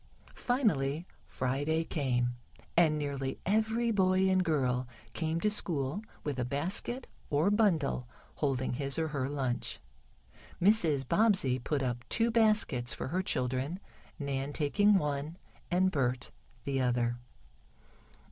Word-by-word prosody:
Finally 170 - 0 0.2
Friday 145 +5 0
came, 125 -6 0 0.5
and 160 -3 +4
nearly 140 -2 -3
every 220 +4 +2
boy 190 -2 +3
and 185 -1 +3
girl 130 -6 +1 0.3
came 160 +2 -1
to 210 +4 +1
school 165 -4 -1 0.2
with 145 -4 -3
a - - +1
basket 180 - -2 0.2
or 155 +7 +3
bundle 165 - +2 0.3
holding 135 -4 0
his 135 +1 -2
or 160 -1 0
her 140 -3 -2
lunch. 130 -4 -2 0.8
Mrs. 165 - +3
Bobbsey 185 - +3
put 140 +2 -1
up 120 -1 -2
two 230 +1 +2
baskets 210 - +2
for - - -4
her 180 +5 0
children, 130 +1 -1 0.4
Nan 140 -1 -3
taking 205 +9 +3
one 150 0 -2 0.3
and 185 +1 +3
Bert 125 -5 -1 0.3
the 135 -1 0
other. 120 -1 +1
145 Hz, 125 wpm, -31 LUFS, 130-185 Hz, 0.8 s, and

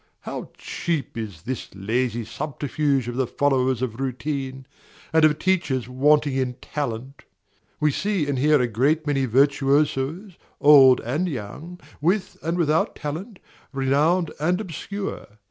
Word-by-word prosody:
How - - -6
cheap 165 -5 -3
is 105 -8 -6
this 130 -1 -5
lazy 115 +4 -1
subterfuge 140 +1 -1
of 120 0 -4
the 130 -2 +1
followers 130 -2 +1
of 120 -1 -4
routine, 135 0 -3 0.5
and 160 0 +4
of 150 -1 +5
teachers 155 - 0
wanting 145 +3 +3
in 130 -2 -1
talent! 135 -1 -5 0.6
We 150 -1 +3
see 195 +1 0
and 140 -3 -1
hear 150 +2 +4
a 125 - +2
great 140 +8 +1
many 140 -3 +1
virtuosos, 140 - +1 0.2
old 135 -3 +7
and 150 +11 -1
young, 150 +8 -7 0.2
with 185 +6 0
and 165 +2 -2
without 160 -2 +1
talent, 170 +8 -6 0.3
renowned 150 +5 +1
and 175 +5 +1
obscure. 200 +1 -5
140 Hz, 135 wpm, -24 LUFS, 130-155 Hz, 0.6 s, old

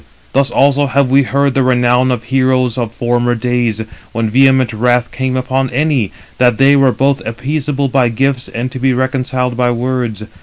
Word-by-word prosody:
Thus 135 0 +2
also 140 +1 +2
have 135 0 +1
we 135 +1 +5
heard 140 +1 0
the 135 - +1
renown 125 0 +2
of 125 -3 -2
heroes 130 -1 +1
of 120 -3 -3
former 120 +1 0
days, 120 -2 -1 0.3
when 115 -1 -2
vehement 130 -1 +3
wrath 120 +2 +1
came 130 +1 -2
upon 130 +1 -1
any, 135 -5 0 0.3
[that] 120 -3 +3
they 135 +3 +5
were 135 -2 +4
both 135 +2 0
appeasable 140 +4 -2
by 125 -2 +1
gifts, 130 +2 -1
and 125 +2 -5
to 130 - -6
be 130 0 +1
reconciled 130 -1 -2
by 125 0 +1
words. 120 -3 -2
130 Hz, 180 wpm, -14 LUFS, 120-135 Hz, 0.3 s, we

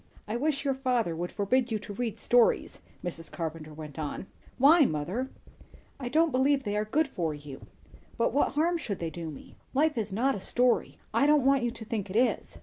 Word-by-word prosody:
"I 215 - -2
wish 285 +3 0
your 275 - +2
father 250 -9 0
would 175 +2 -4
forbid 240 +5 +1
you 220 - +1
to 205 0 -8
read 230 +1 -3
stories," 240 -1 +2 0.2
Mrs. 165 -2 -5
Carpenter 160 -2 -5
went 150 0 -9
on. 150 +4 -4 0.3
"Why, 300 +5 +7
mother?" 185 - -1 0.7
"I 250 -3 -4
don't 320 +4 +3
believe 270 +2 +2
they 205 -1 -2
are 210 0 0
good 295 +8 +1
for 165 - -2
you." 145 -2 -10 0.5
"But 230 - +1
what 285 - +2
harm 335 +3 +1
should 205 - -3
they 165 -1 -4
do 165 0 -6
me?" 145 - -11 0.2
"Life 300 -2 +2
is 215 -2 -3
not 250 +8 +1
a 200 - -5
story. 245 +4 +1 0.2
I 280 - +4
don't 295 -3 +4
want 275 -1 +4
you 240 - +1
to 230 -1 -8
think 210 -3 -3
it 185 - -6
is." 245 +3 +1
235 Hz, 210 wpm, -29 LUFS, 175-270 Hz, 0.7 s, Why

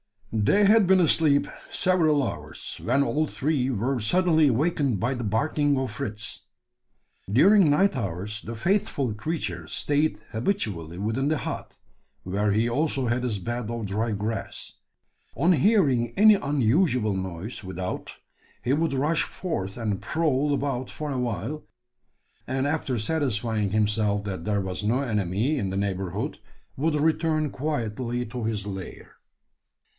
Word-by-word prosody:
They 110 - +3
had 210 -1 +5
been 190 0 +5
asleep 155 -3 +3 0.2
several 160 -6 +2
hours, - - -7
when 130 +4 +2
all 155 +2 0
three 140 -3 0
were 125 +2 0
suddenly 160 - +3
awakened 140 - +1
by 120 +6 0
the 125 -3 -4
barking 145 +6 +1
of 130 -3 -2
Fritz. 105 -1 -5 0.9
During 175 - +6
night 195 +7 +3
hours 100 +3 -4
the 115 - -6
faithful 140 - 0
creature 105 - -4
stayed 150 - 0
habitually 105 - -2
within 110 +8 -1
the 155 +1 +1
hut - - -6 0.5
where 100 +3 0
he 110 +3 +2
also 135 +1 0
had 120 +2 0
his 110 -5 -1
bed 120 +3 -4
of 115 -2 -3
dry 110 +4 -1
grass. 105 +2 -4 0.6
On 170 +6 +3
hearing 140 - +3
any 215 +1 +8
unusual 135 - +2
noise 95 +4 -5
without, 95 0 -5 0.5
he 125 - 0
would 160 0 +1
rush 150 +4 +1
forth 100 - -4
and 105 -5 -2
prowl 150 -3 +1
about 135 -3 -2
for 150 -2 -5
awhile; 125 - -3 0.8
and, 130 +1 -1
after 145 -4 -1
satisfying 110 -5 0
himself 105 -1 +1
that 95 -4 -5
there 100 -1 +1
was 95 0 -3
no 120 +6 +1
enemy 110 - 0
in 100 -4 -1
the 95 - -2
neighbourhood, 95 -2 -2 0.4
would 155 +3 +1
return 155 -1 +1
quietly 125 -4 -2
to 120 0 -5
his 105 -3 -2
lair. 95 -2 -8
125 Hz, 140 wpm, -26 LUFS, 105-150 Hz, 0.9 s, any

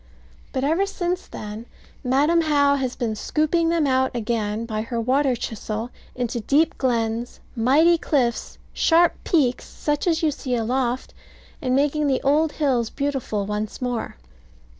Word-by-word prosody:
But 260 - -2
ever 330 +8 +2
since 360 -2 -3
then, 215 +2 -8 0.4
Madam 290 +6 +3
How 285 -3 +3
has 260 -3 -2
been 225 -3 -2
scooping 315 +8 +1
them 335 -2 +2
out 260 -1 +1
again 220 -1 -2
by 215 -2 -3
her 235 +1 -3
water 260 +3 +2
chisel 225 +1 -4 0.2
into 245 -1 -2
deep 290 +8 +2
glens, 235 -2 -1 0.2
mighty 300 +9 +4
cliffs, 250 -8 0 0.2
sharp 335 +1 +4
peaks, 270 -8 +1
such 295 +3 -2
as 330 -1 +1
you 310 - +3
see 260 -3 -3
aloft, 245 +2 -1 0.5
and 255 -3 +1
making 295 +2 +1
the 265 -2 +2
old 295 +3 +2
hills 255 -7 +1
beautiful 270 -8 -2
once 210 +1 -4
more. 245 -2 -3
260 Hz, 145 wpm, -23 LUFS, 235-300 Hz, 0.5 s, mighty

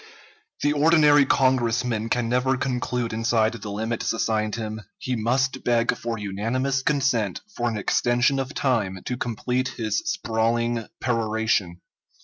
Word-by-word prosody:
The 145 - +3
ordinary 150 -2 +5
Congressman 120 -3 +1
can 120 -1 0
never 125 +2 +1
conclude 125 -2 -2
inside 115 0 +1
the 110 -2 -7
limits 110 +3 -2
assigned 110 -1 0
him; 110 -1 -5 0.2
he 130 -9 -3
must 130 +4 0
beg 120 -1 +2
for 115 -1 -4
unanimous 115 +7 -1
consent 130 -9 0
for 120 0 0
an 110 - -3
extension 120 +6 +2
of 135 +2 -4
time 100 -9 0
to 125 - -2
complete 125 +2 -2
his 110 -3 0
sprawling 115 0 -1
peroration. 110 -6 0
120 Hz, 130 wpm, -24 LUFS, 110-130 Hz, 0.2 s, ordinary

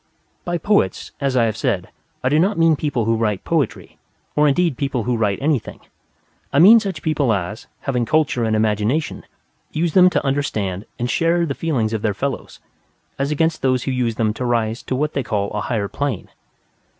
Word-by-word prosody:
By 175 0 -1
poets, 170 - 0
as 135 -2 +1
I 120 - +4
have 110 -2 -1
said, - - -1 0.3
I 130 - +2
do 150 +3 +3
not 195 +4 +2
mean 165 -1 +4
people 140 -6 -1
who 115 +1 +2
write 105 -4 -1
poetry, - - -2 0.4
or 150 0 +4
indeed 165 +1 +2
people 130 -3 -2
who 125 +1 0
write 105 -3 0
anything. 145 -3 -1 0.7
I - - 0
mean 205 +9 +9
such 195 -8 -5
people 150 -6 +1
as, 100 +1 -3
having 125 -4 -1
culture 145 -4 +1
and 110 -1 +1
imagination, 110 +7 0 0.5
use 165 0 -1
them 185 -1 +7
to - - -1
understand 110 -9 -1
and 120 - -2
share 170 +6 +2
the 140 - -2
feelings 130 -9 -1
of 110 - -2
their 105 -3 0
fellows; 140 +4 -4 0.6
as 140 +1 0
against 160 +2 0
those 130 -2 +1
who 135 - -2
use 125 -3 0
them 110 -1 0
to 125 - -5
rise 115 -1 0
to 130 - -3
what 150 +3 -1
they 140 - 0
call 100 -4 -2
a 105 - -2
higher 100 0 -1
plane. 140 -3 -3
130 Hz, 195 wpm, -20 LUFS, 110-155 Hz, 0.7 s, mean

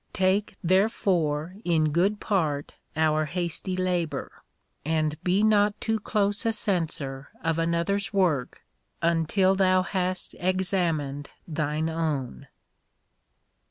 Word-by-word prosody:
Take, 190 +2 +1
therefore, 180 -3 +1
in 160 -3 +2
good 195 +6 +2
part 155 -8 -1 0.2
our 155 0 +2
hasty 180 +3 -3
labour, 180 -3 -2 0.4
and 155 0 0
be 185 +3 +2
not 205 -1 +3
too 225 -1 0
close 205 0 0
a 225 - +2
censor 160 -10 -1
of 165 0 0
another's 170 +4 0
work 175 - 0 0.4
until 170 +3 +3
thou 185 -1 +3
hast 185 -1 -2
examined 175 -7 0 0.2
thine 155 0 -1
own. 155 - -3
175 Hz, 105 wpm, -26 LUFS, 155-195 Hz, 0.4 s, not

